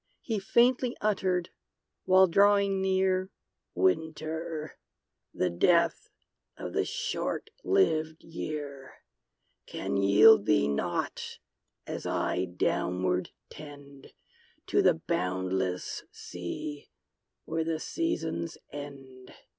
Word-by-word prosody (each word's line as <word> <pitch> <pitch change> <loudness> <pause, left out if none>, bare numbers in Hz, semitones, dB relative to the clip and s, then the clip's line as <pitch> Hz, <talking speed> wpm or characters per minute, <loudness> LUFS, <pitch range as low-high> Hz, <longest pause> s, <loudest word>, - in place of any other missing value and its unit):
He 220 -4 -1
faintly 240 +5 +2
uttered, 185 -4 0 0.5
while 185 0 +7
drawing 200 +1 +3
near, 190 0 +1 0.5
"Winter, 160 - -1 0.5
the 90 - 0
death 170 - +2 0.5
of - - -6
the - - +1
short - - -3
lived 160 - +1
year, 145 -5 -6 0.7
Can - - -3
yield 105 - +6
thee 70 - +4
nought, 85 +5 -2 0.5
as - - -5
I 90 - 0
downward 90 +1 -1 0.2
tend 145 -2 -12 0.6
To - - +4
the - - +5
boundless 90 0 -2
sea, 145 - -7 0.6
where 160 0 -1
the 160 -1 -2
Seasons 165 - -2
end! 135 -3 -10
155 Hz, 90 wpm, -29 LUFS, -, 0.7 s, while